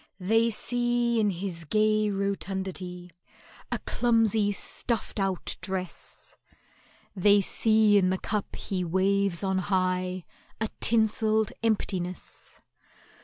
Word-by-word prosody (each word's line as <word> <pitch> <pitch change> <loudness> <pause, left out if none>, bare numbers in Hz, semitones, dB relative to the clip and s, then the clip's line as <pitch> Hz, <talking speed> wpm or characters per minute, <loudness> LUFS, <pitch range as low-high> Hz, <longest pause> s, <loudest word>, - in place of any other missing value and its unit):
They 225 +5 +3
see 240 +1 0
in 210 -1 +3
his 180 -2 -4
gay 215 +4 +2
rotundity 190 -2 -4 0.6
A - - +1
clumsy 225 -3 +2
stuffed 220 +2 -3
out 195 -2 -1
dress— 185 -1 -5 0.8
They 205 +2 +5
see 215 +1 +4
in 185 -1 +2
the 190 - 0
cup 210 +1 -3
he 185 -2 -3
waves 190 +1 +1
on 190 -1 +1
high 185 -1 -1 0.3
A 220 -1 -1
tinselled 220 -1 +3
emptiness. 190 -5 -3
200 Hz, 105 wpm, -27 LUFS, 185-220 Hz, 0.8 s, They